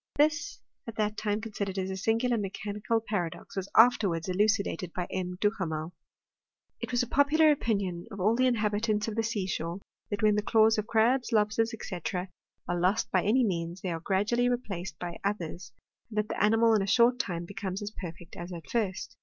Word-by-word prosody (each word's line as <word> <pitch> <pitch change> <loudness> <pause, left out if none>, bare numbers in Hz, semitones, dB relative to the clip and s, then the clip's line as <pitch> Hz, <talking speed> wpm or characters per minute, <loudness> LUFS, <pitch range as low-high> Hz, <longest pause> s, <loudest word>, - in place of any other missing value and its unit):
This, 300 +6 +1 0.3
at 230 - -6
that 215 -1 0
time 210 0 -1
considered 200 -3 -4
as 190 0 -2
a - - -3
sin 225 +4 +1
gular 240 -2 +1
mechanical 205 +3 -2
paradox, 190 -7 -4
was 195 0 -3
afterwards 205 -8 +5
elucidated 200 -1 +1
by 180 -2 -2
M. 180 -1 -3
Duhamel. 175 -6 -1 0.9
It - - -5
was 245 0 +2
a - - -4
popular 300 +4 +4
opinion 200 -10 -1
of 200 -2 -8
all 210 +5 +3
the 255 +1 +3
inhabitants 215 -2 +1
of 220 - -2
the 225 - +1
sea 220 -4 -1
shore, 170 0 -3 0.3
that 205 0 -3
when 210 -1 +5
the 210 - +1
claws 220 0 +4
of 215 - -3
crabs, 235 +3 +2
lobsters, 220 +1 +2
&c., 180 -4 -5 0.7
are 175 0 -1
lost 195 +6 +1
by 185 - +3
any 240 +7 +3
means, 170 -3 -2
they 185 - -2
are 165 - -3
gradually 210 +8 +1
replaced 195 -8 -3
by 175 -1 -6
others, 180 -3 -3 0.4
and 210 -1 -1
the - - -1
animal 225 +2 +4
in 215 - +3
a 195 - -2
short 240 +4 +4
time 175 -8 -2
becomes 195 +1 -5
as 205 - -5
perfect 170 -4 -9
as 175 +1 -7
at 170 -2 -8
first. 210 -5 -2
210 Hz, 195 wpm, -29 LUFS, 185-225 Hz, 0.9 s, afterwards